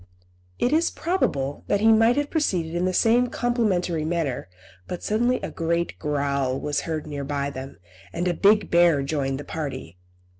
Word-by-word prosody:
It 250 Hz, -, +1 dB
is 325 Hz, +2 st, +3 dB
probable 145 Hz, -, -1 dB
that 205 Hz, -, +2 dB
he 220 Hz, +2 st, +5 dB
might 225 Hz, +3 st, +4 dB
have 290 Hz, 0 st, -1 dB
proceeded 180 Hz, -, 0 dB
in 175 Hz, +1 st, 0 dB
the 185 Hz, -, +1 dB
same 235 Hz, +6 st, +3 dB
complimentary 205 Hz, -10 st, 0 dB
manner, 155 Hz, -, -2 dB, 0.4 s
but 180 Hz, -, -6 dB
suddenly 240 Hz, +4 st, +1 dB
a -, -, -4 dB
great 170 Hz, +1 st, -2 dB
growl 140 Hz, -3 st, -1 dB
was 150 Hz, -1 st, -1 dB
heard 155 Hz, -2 st, -2 dB
near 145 Hz, -2 st, -5 dB
by 140 Hz, 0 st, -2 dB
them, 135 Hz, 0 st, -8 dB, 0.3 s
and 175 Hz, +2 st, -2 dB
a 175 Hz, -, +2 dB
big 205 Hz, +4 st, +3 dB
bear 170 Hz, -5 st, +4 dB
joined 135 Hz, -2 st, -2 dB
the -, -, -6 dB
party. 135 Hz, -, -6 dB
170 Hz, 175 wpm, -24 LUFS, 140-220 Hz, 0.4 s, he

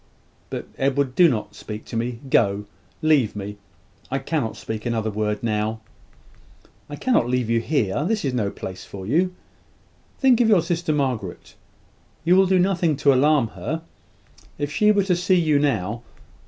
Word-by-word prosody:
But, -, -, -5 dB
Edward, 135 Hz, -1 st, +1 dB
do 175 Hz, +5 st, +6 dB
not 105 Hz, -5 st, -3 dB
speak 105 Hz, +1 st, -8 dB
to -, -, -8 dB
me. 115 Hz, +1 st, -2 dB
Go: 105 Hz, -5 st, +2 dB, 0.4 s
leave 145 Hz, -10 st, +3 dB
me! 105 Hz, 0 st, -6 dB, 0.5 s
I 135 Hz, -, -1 dB
cannot 135 Hz, -3 st, -2 dB
speak 110 Hz, -1 st, -5 dB
another 115 Hz, -2 st, -1 dB
word 105 Hz, +1 st, -2 dB
now 110 Hz, 0 st, -1 dB, 0.5 s
" -, -, -30 dB
"I 145 Hz, -, -5 dB
cannot 150 Hz, -, +1 dB
leave 125 Hz, -2 st, 0 dB
you 115 Hz, -, +3 dB
here. 115 Hz, -2 st, 0 dB
This 210 Hz, 0 st, -1 dB
is 135 Hz, -, -1 dB
no 110 Hz, -5 st, 0 dB
place 95 Hz, -1 st, -7 dB
for 95 Hz, -1 st, -9 dB
you. 175 Hz, -, +1 dB, 0.8 s
Think 255 Hz, -3 st, +4 dB
of 225 Hz, -, +4 dB
your 195 Hz, -7 st, +5 dB
sister, 170 Hz, -1 st, -1 dB
Margaret. 130 Hz, -, -2 dB, 0.7 s
You 175 Hz, +3 st, +4 dB
will 190 Hz, 0 st, +5 dB
do 190 Hz, 0 st, +3 dB
nothing 180 Hz, -4 st, +2 dB
to 140 Hz, -1 st, +4 dB
alarm 140 Hz, -2 st, +3 dB
her. 160 Hz, +10 st, -5 dB, 0.7 s
If 145 Hz, 0 st, -3 dB
she 210 Hz, +7 st, +4 dB
were 205 Hz, -1 st, +3 dB
to 185 Hz, -2 st, +1 dB
see 180 Hz, +1 st, +2 dB
you 155 Hz, -4 st, +3 dB
now 115 Hz, -6 st, 0 dB
135 Hz, 170 wpm, -23 LUFS, 110-170 Hz, 0.8 s, do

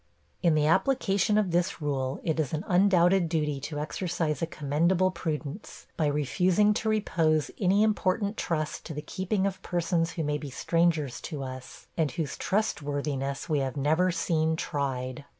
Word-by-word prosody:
In 170 Hz, -4 st, +3 dB
the 150 Hz, -1 st, +3 dB
application 200 Hz, -, +2 dB
of 205 Hz, -4 st, +1 dB
this 170 Hz, 0 st, 0 dB
rule, 135 Hz, -3 st, -2 dB
it 160 Hz, -1 st, 0 dB
is 150 Hz, -3 st, -1 dB
an 155 Hz, +2 st, -1 dB
undoubted 180 Hz, -2 st, +4 dB
duty 150 Hz, -4 st, 0 dB
to 150 Hz, +2 st, -5 dB
exercise 165 Hz, 0 st, -2 dB
a 165 Hz, -, 0 dB
commendable 170 Hz, +5 st, +1 dB
prudence, 160 Hz, 0 st, -5 dB
by 155 Hz, -, +1 dB
refusing 180 Hz, +8 st, +2 dB
to 220 Hz, +1 st, -1 dB
repose 165 Hz, -8 st, +1 dB
any 195 Hz, +2 st, +3 dB
important 205 Hz, -1 st, +1 dB
trust 155 Hz, -6 st, -2 dB
to 160 Hz, -, -6 dB
the 150 Hz, -, -5 dB
keeping 190 Hz, +4 st, -1 dB
of 190 Hz, -1 st, -2 dB
persons 170 Hz, -1 st, 0 dB
who 165 Hz, -, -2 dB
may 150 Hz, 0 st, -1 dB
be 145 Hz, -, -6 dB
strangers 155 Hz, -1 st, 0 dB
to 150 Hz, -5 st, -5 dB
us, 130 Hz, -1 st, -8 dB
and 160 Hz, -3 st, +1 dB
whose 150 Hz, -3 st, -3 dB
trustworthiness 145 Hz, -8 st, -2 dB
we 150 Hz, -3 st, +1 dB
have 135 Hz, 0 st, -2 dB
never 160 Hz, +6 st, +2 dB
seen 160 Hz, -1 st, +1 dB
tried. 135 Hz, -4 st, -3 dB
160 Hz, 165 wpm, -28 LUFS, 150-185 Hz, -, undoubted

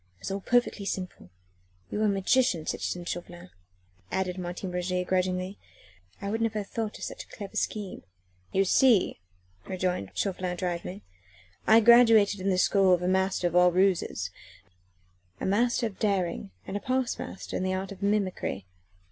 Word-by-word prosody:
It -, -, -33 dB
was -, -, -4 dB
all 195 Hz, +1 st, -3 dB
perfectly 245 Hz, -2 st, +1 dB
simple. 185 Hz, -, -5 dB, 0.6 s
You 210 Hz, -, -2 dB
are -, -, +3 dB
a -, -, +3 dB
magician, 195 Hz, -3 st, +2 dB
citizen 175 Hz, -1 st, -3 dB
Chauvelin," 175 Hz, +1 st, -6 dB, 0.6 s
added 185 Hz, -1 st, -1 dB
Martin 180 Hz, +1 st, -5 dB
Roget 180 Hz, 0 st, -1 dB
grudgingly. 185 Hz, +1 st, -1 dB, 0.6 s
"I 200 Hz, -, -7 dB
never 220 Hz, +3 st, -1 dB
would 225 Hz, -, 0 dB
have 205 Hz, -2 st, -2 dB
thought 220 Hz, -2 st, -3 dB
of -, -, -9 dB
such -, -, -5 dB
a -, -, -24 dB
clever 200 Hz, -3 st, -9 dB, 0.2 s
ruse." 205 Hz, -3 st, -6 dB, 0.5 s
"You 195 Hz, -, +2 dB
see," 230 Hz, 0 st, +4 dB, 0.5 s
rejoined 180 Hz, -, -2 dB
Chauvelin 185 Hz, -2 st, -2 dB
drily, 180 Hz, +2 st, -4 dB, 0.6 s
"I 225 Hz, +1 st, +7 dB
graduated 225 Hz, -3 st, +6 dB
in 190 Hz, +1 st, -1 dB
the 185 Hz, -, +2 dB
school 190 Hz, 0 st, +4 dB
of 175 Hz, -, -6 dB
a -, -, 0 dB
master 190 Hz, 0 st, +1 dB
of 175 Hz, 0 st, 0 dB
all 180 Hz, 0 st, +6 dB
ruses 180 Hz, -, +1 dB, 1.1 s
a -, -, -3 dB
master 235 Hz, +5 st, +2 dB
of 215 Hz, -4 st, -5 dB
daring 185 Hz, -, 0 dB, 0.2 s
and 195 Hz, -, -6 dB
a -, -, 0 dB
past 255 Hz, +1 st, -1 dB
master -, -, -6 dB
in -, -, -1 dB
the 185 Hz, 0 st, 0 dB
art 190 Hz, +2 st, -4 dB
of 195 Hz, -1 st, -10 dB
mimicry. 200 Hz, -, -1 dB
190 Hz, 170 wpm, -28 LUFS, 180-210 Hz, 1.1 s, I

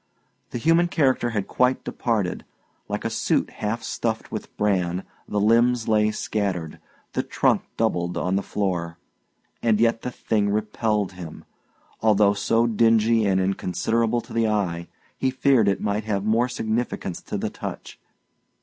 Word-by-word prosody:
The -, -, -4 dB
human 165 Hz, +7 st, +3 dB
character 135 Hz, -7 st, +2 dB
had 105 Hz, -4 st, -2 dB
quite 125 Hz, +1 st, +1 dB
departed. 105 Hz, -7 st, -1 dB, 0.5 s
Like -, -, -3 dB
a -, -, +1 dB
suit -, -, 0 dB
half 115 Hz, +2 st, -3 dB
stuffed 115 Hz, -1 st, -3 dB
with 110 Hz, -, -7 dB
bran, 95 Hz, -3 st, 0 dB, 0.2 s
the 105 Hz, -, -1 dB
limbs 115 Hz, +2 st, +3 dB
lay 105 Hz, -1 st, +3 dB
scattered, 100 Hz, -6 st, -2 dB, 0.3 s
the -, -, +1 dB
trunk -, -, +1 dB, 0.2 s
doubled, 90 Hz, -6 st, 0 dB
on 90 Hz, +1 st, 0 dB
the 100 Hz, -, +1 dB
floor; 85 Hz, -5 st, -2 dB, 0.6 s
and 110 Hz, -2 st, +2 dB
yet 115 Hz, 0 st, +2 dB
the -, -, -3 dB
thing 105 Hz, -4 st, 0 dB
repelled 105 Hz, -1 st, 0 dB
him. 90 Hz, -4 st, -9 dB, 0.6 s
Although 105 Hz, -2 st, +4 dB
so 115 Hz, +3 st, +2 dB
dingy 115 Hz, -1 st, +3 dB
and 95 Hz, -1 st, +2 dB
inconsiderable 110 Hz, +5 st, 0 dB
to -, -, -13 dB
the 115 Hz, -1 st, +2 dB
eye, 90 Hz, -6 st, -1 dB, 0.3 s
he 130 Hz, -, +2 dB
feared 130 Hz, -4 st, +3 dB
it 100 Hz, -, +2 dB
might 105 Hz, 0 st, -1 dB
have 100 Hz, -2 st, -1 dB
more 115 Hz, +3 st, +2 dB
significance 110 Hz, -6 st, -2 dB
to -, -, -4 dB
the -, -, -3 dB
touch. -, -, -7 dB
110 Hz, 150 wpm, -24 LUFS, 100-115 Hz, 0.6 s, Although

